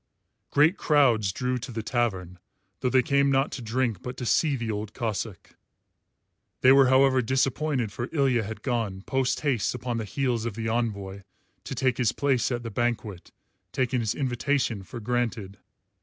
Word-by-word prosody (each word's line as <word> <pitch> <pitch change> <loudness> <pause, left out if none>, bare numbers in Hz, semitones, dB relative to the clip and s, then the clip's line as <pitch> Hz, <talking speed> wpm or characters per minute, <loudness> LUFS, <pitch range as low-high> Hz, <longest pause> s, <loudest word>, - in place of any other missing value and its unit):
Great 155 +6 +4
crowds 120 - +3
drew 125 +6 -2
to 125 +1 -7
the 115 -1 -4
tavern, 95 -7 -2 0.4
though 125 - 0
they 130 0 +4
came 140 +2 +2
not 135 +1 +2
to 130 - -6
drink 115 -4 -1
but 125 - -7
to 125 - -4
see 145 +4 +2
the 115 -3 -3
Old 105 0 -5
Cossáck. 110 -4 -4 1.1
They 130 - +7
were 135 -1 +7
however 130 0 +4
disappointed, 130 0 0
for 120 +4 -5
Ilya 135 -6 +2
had 110 0 -7
gone, 110 -7 -2
post 130 +1 0
haste 135 -7 0
upon 125 -1 -3
the 110 - -3
heels 120 +1 -1
of 115 -3 -4
the 110 0 -3
envoy, 100 -4 -2 0.4
to 135 - -5
take 130 -1 0
his 120 -4 +2
place 135 -4 +1
at 120 -1 -2
the 115 - -5
banquet, 110 -4 -3 0.4
taking 130 -1 0
his 115 0 -1
invitation 130 -4 -1
for 95 +5 -9
granted. 115 -4 -2
120 Hz, 170 wpm, -26 LUFS, 110-130 Hz, 1.1 s, They